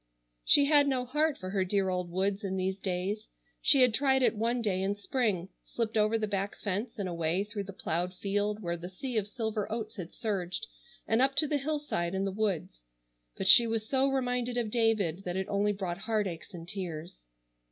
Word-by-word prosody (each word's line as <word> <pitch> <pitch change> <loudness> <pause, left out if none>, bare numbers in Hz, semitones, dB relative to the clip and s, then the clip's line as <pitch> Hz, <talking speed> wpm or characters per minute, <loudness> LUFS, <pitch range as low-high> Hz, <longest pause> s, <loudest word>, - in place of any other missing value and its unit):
She 285 - +6
had 290 -1 +5
no 255 -2 0
heart 300 +4 +1
for 185 -1 -6
her 195 -1 +1
dear 190 0 +1
old 180 -1 -2
woods 195 +4 -1
in 190 -1 -2
these 190 +1 -1
days. 195 +3 -2 0.3
She 275 -3 +6
had 250 -3 +4
tried 265 +1 +3
it 245 - +3
one 230 +3 0
day 200 -5 0
in 195 +1 0
spring; 205 -4 -1
slipped 225 -1 -3
over 215 +1 +3
the 220 - 0
back 200 -1 -2
fence 210 +4 -3
and 200 -3 -2
away 170 +2 0
through 205 -1 -5
the 195 - -8
ploughed 180 0 -2
field 205 +2 -1
where 170 0 -2
the 175 +1 -7
sea 250 +7 -6
of 205 -2 0
silver 220 -2 -3
oats 220 -1 -4
had 180 -3 -6
surged, 195 - -3 0.4
and 225 +2 +3
up 270 +1 +3
to 305 - +4
the 295 - +1
hillside 275 - -2
and 190 +1 0
the 195 - -1
woods; 190 - -2 0.6
but - - -2
she 235 - +9
was 225 -1 -2
so 270 +1 +2
reminded 250 -2 0
of 230 -3 -1
David 210 -7 +1
that 180 0 -3
it 190 - -1
only 205 +1 +1
brought 190 -3 -3
heart 215 0 0
aches 170 -1 -6
and 170 -3 -9
tears. 170 - -6
205 Hz, 210 wpm, -30 LUFS, 185-235 Hz, 0.6 s, she